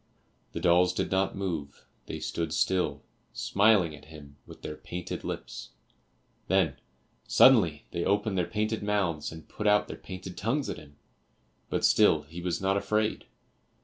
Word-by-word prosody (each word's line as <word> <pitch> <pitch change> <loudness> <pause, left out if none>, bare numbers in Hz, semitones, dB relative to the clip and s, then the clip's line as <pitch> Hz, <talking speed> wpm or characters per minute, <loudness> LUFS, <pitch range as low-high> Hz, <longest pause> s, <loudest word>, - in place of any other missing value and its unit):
The - - -3
dolls 90 +1 +4
did - - -1
not 95 0 +1
move; 85 -8 -4 0.2
they - - -5
stood 80 -2 -3
still, 90 +2 0 0.3
smiling 100 -6 +3
at 75 - -15
him 75 -3 -13
with - - -13
their 75 - -5
painted 90 +2 -6
lips, 65 -1 -6 0.7
then 90 -8 +2 0.5
suddenly 90 - +5
they 85 -1 -2
opened 100 0 +1
their 90 -2 0
painted 110 +4 -1
mouths 100 -7 -1
and 80 0 -11
put 105 - -3
out 105 0 +4
their - - -7
painted 95 -1 -8
tongues 130 +8 -1
at - - -6
him; 70 -1 -16 0.7
but - - 0
still 75 -2 +4
he 85 +4 -9
was 85 -1 -2
not 95 +1 +1
afraid. 105 +1 -1
90 Hz, 155 wpm, -28 LUFS, 80-100 Hz, 0.7 s, suddenly